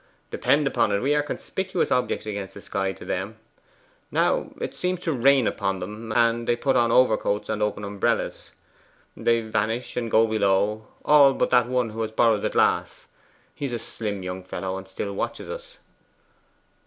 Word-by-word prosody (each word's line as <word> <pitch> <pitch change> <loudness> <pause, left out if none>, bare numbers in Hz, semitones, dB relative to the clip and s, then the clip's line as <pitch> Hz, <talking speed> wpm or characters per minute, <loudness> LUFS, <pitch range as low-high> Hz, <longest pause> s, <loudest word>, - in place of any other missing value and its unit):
Depend 145 +1 +2
upon 130 -5 +1
it 100 - +1
we 140 +3 +2
are 150 - +3
conspicuous 185 +4 -3
objects 125 -3 0
against 100 -3 -5
the 100 - -9
sky 95 -1 -2
to - - -11
them. 100 +4 -3 0.7
Now, - - +1
it - - -4
seems 180 0 -2
to 165 - -1
rain 135 0 +4
upon 95 -2 -1
them, 105 +4 -7
and 115 0 +2
they 120 - +3
put 135 +2 0
on 120 -2 +3
overcoats 110 -4 +2
and 110 -1 -2
open 105 0 -1
umbrellas. 100 0 -1 0.7
They 115 0 +2
vanish 110 +2 -2
and 120 -2 -2
go 110 +1 +5
below 105 0 +1 0.2
all 140 -2 +6
but - - 0
that 125 -2 +4
one 125 -2 0
who 115 +1 -5
has 110 -1 -2
borrowed 110 -1 +3
the - - 0
glass. - - 0 0.4
He 145 - -5
is 130 - -3
a - - 0
slim 105 -3 -5
young 90 0 -5
fellow, 95 +1 -4
and 95 0 -7
still 100 +1 -5
watches - - -4
us. - - -9
110 Hz, 180 wpm, -25 LUFS, 100-125 Hz, 0.7 s, all